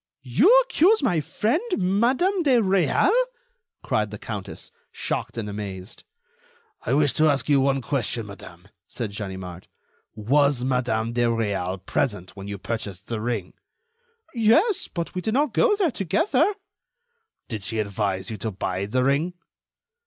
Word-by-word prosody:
"You 175 - +4
accuse 435 - +3
my 180 -11 +2
friend, 215 - 0 0.2
Madam 245 - +2
de 275 -6 +4
Réal?" 195 - +3 0.7
cried 105 -1 0
the 105 - -7
countess, 100 -2 -7 0.2
shocked - - -4
and 110 -2 -3
amazed. 100 0 -7 0.8
"I - - 0
wish 145 -3 +3
to 155 +3 +4
ask 140 -1 0
you 140 -2 +4
one 135 -1 +1
question, 120 -4 -1
madame," 95 -3 -12 0.2
said 115 -5 -5
Ganimard. 95 -3 -7 0.5
"Was 135 +4 +2
Madam 120 -3 0
de 120 0 +2
Réal 100 -5 -1
present 105 -8 -2
when 100 0 -8
you 100 0 -5
purchased 100 -2 -5
the 115 -2 -2
ring?" 110 -6 -3 0.8
"Yes, 275 - +3
but 170 -1 -5
we 180 - -3
did 220 +4 -1
not 285 -3 +2
go 460 -4 +4
there 380 -7 +1
together." 200 - +1 1.0
"Did 110 -3 -5
she 110 +3 -4
advise 100 -2 -2
you 110 - -5
to 110 +3 -3
buy 95 -1 -3
the 125 +4 +1
ring?" 145 +7 +1
120 Hz, 145 wpm, -24 LUFS, -, 1.0 s, You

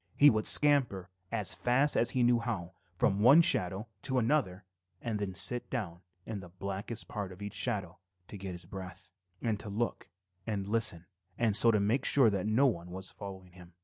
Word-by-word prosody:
He 145 0 +7
would 110 -1 0
scamper 125 -11 +4 0.2
as 110 -4 +1
fast 135 +4 +1
as 120 - +3
he 125 0 +1
knew 120 0 +3
how 100 -7 -5 0.2
from 100 - +1
one 135 +10 +6
shadow 95 - 0
to 130 - -2
another 115 -7 0 0.3
and 110 -3 -4
then 95 -2 -4
sit 120 +6 +2
down 95 -9 -5 0.2
in 110 -3 -6
the 90 -2 -12
blackest 100 +5 -5
part 100 -4 -6
of 90 - -13
each 100 0 -7
shadow 100 -9 -2 0.3
to - - -11
get 95 -2 -7
his 90 0 -7
breath, 95 -1 -10 0.3
and 110 -3 -1
to 105 - -7
look 115 +4 -4 0.4
and 100 -3 -3
listen 105 -6 -2 0.3
and 115 -4 +1
so 115 +2 +7
make 105 +6 +1
sure 130 -6 +5
that 100 +1 -2
no 115 +6 +3
one 90 -9 -1
was 95 +1 -6
following 95 -2 -10
him. 90 -1 -16
105 Hz, 190 wpm, -30 LUFS, 95-120 Hz, 0.4 s, He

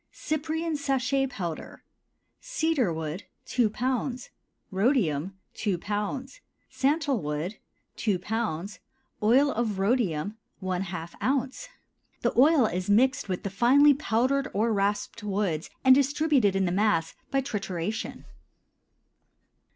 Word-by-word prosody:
CYPRIAN 315 +1 -2
SACHET 270 -1 0
POWDER. 175 -9 -6 0.6
Cedar 320 - 0
wood 160 +3 -4 0.2
2 240 -4 +2
lb. 250 +2 -2 0.4
Rhodium 190 - +1 0.2
2 200 -5 -1
lb. 210 +8 -4 0.3
Santal 280 - +1
wood 150 +7 -3 0.4
2 205 -5 +1
lb. 205 -2 -3 0.4
Oil 260 +7 +4
of 220 -4 -1
rhodium 200 -2 0 0.2
½ 180 -2 -4
oz. 270 - -1 0.5
The - - +1
oil 280 0 +6
is 185 -1 -2
mixed 255 +2 +3
with 185 - -2
the 200 - -3
finely 270 +8 +6
powdered 270 0 +1
or 220 +2 +2
rasped 205 +3 -1
woods 195 -6 -1 0.2
and 260 - +9
distributed 280 -6 +3
in 195 0 +2
the 175 - 0
mass 180 -4 +1 0.2
by 275 0 +1
trituration. 210 -4 -4
220 Hz, 110 wpm, -27 LUFS, 190-270 Hz, 0.6 s, and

